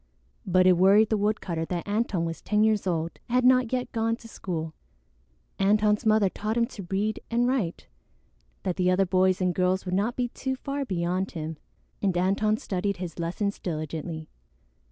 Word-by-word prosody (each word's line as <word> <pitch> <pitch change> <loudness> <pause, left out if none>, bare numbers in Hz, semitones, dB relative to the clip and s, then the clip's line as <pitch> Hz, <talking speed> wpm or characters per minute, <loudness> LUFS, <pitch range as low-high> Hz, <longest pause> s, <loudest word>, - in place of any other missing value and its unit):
But 185 0 +4
it 185 -1 +6
worried 200 +4 +5
the 220 - +2
woodcutter 200 -5 -1
that 175 +2 -4
Antone 205 -5 0
was 165 0 -5
ten 210 0 +2
years 215 -3 +2
old 165 -2 -2
and 240 - 0
had 255 - +4
not 255 -2 +4
yet 250 -1 -2
gone 225 -1 0
to 230 - -14
school. 165 -7 -5 0.9
Antone's 210 +2 +3
mother 215 -2 +4
taught 215 +4 -3
him 235 - +3
to 200 -5 -9
read 205 +3 -1
and 240 +1 +2
write, 235 -10 -1 0.8
that 180 - -2
the 180 -1 +2
other 185 +1 +3
boys 185 +1 +2
and 180 -1 +2
girls 185 +2 +1
would 180 - -3
not 210 +6 0
be 245 -1 -1
too 265 +2 -3
far 275 +1 -4
beyond 185 -1 -1
him, 160 -2 -5 0.4
and 190 -3 +1
Antone 200 +4 +2
studied 200 -1 -2
his 175 -1 -6
lessons 190 +5 -2
diligently. 155 -1 -4
195 Hz, 180 wpm, -27 LUFS, 180-220 Hz, 0.9 s, it